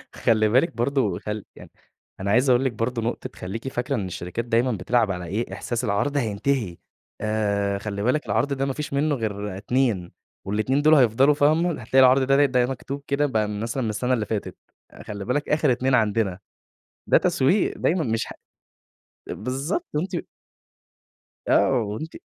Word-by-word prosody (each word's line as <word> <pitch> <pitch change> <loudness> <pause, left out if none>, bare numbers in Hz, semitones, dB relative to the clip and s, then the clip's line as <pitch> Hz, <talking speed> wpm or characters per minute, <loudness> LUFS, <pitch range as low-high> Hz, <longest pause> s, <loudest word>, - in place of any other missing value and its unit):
خلّي 110 -1 +2
بالِك 135 +8 +2
برضو 120 -6 0
خل 105 -1 -5
يعني، - - -13 0.5
أنا 100 +1 -1
عايز 125 +4 +3
أقول 125 +2 +4
لِك 130 - +1
برضو 115 +2 -2
نقطة 115 +2 -3
خلّيكِ 115 +8 -6
فاكرة 130 +1 -2
إن 105 - -2
الشركات 90 +5 -5
دايمًا 120 +2 +2
بتلعب 110 +2 +1
على 90 -2 -4
إيه 105 +8 -3
إحساس 120 0 -3
العرض 125 +7 0
هينتهي 110 -4 -1 0.4
آآ، 100 -2 0
خلّي 100 0 -4
بالِك 130 +5 +1
العرض 115 +7 0
ده 135 0 -1
ما 135 - -2
فيش 150 -1 -5
منه 145 +1 +1
غير 105 -4 -4
2 110 -5 0 0.3
وال2 110 +8 0
دُول 155 +1 +6
هيفضلوا 130 +2 +4
فاهمة، 155 +1 +2
هتلاقي 130 +4 +2
العرض 130 +1 +6
ده 135 +2 +4
ده 125 -2 +2
مكتوب 135 +2 -5
كده 140 +1 +1
بقى 110 -6 0
مثلًا 115 +5 -3
من 110 - -1
السنة 125 +4 0
اللي 115 -4 0
فاتت، 105 -1 -4 0.5
"خلّي 100 -1 -6
بالك 145 +5 -1
آخر 150 -3 +3
2 130 +2 +2
عندنا" 105 -4 +1 0.7
ده - - +6
تسويق 180 +10 +1
دايمًا 170 0 +1
مش 115 -3 -1 1.0
بالضبط 135 - -3
وأنتِ 175 +5 -2 1.3
آه - - +4
وأنتِ 110 +10 -5
120 Hz, 165 wpm, -24 LUFS, 105-135 Hz, 1.3 s, دُول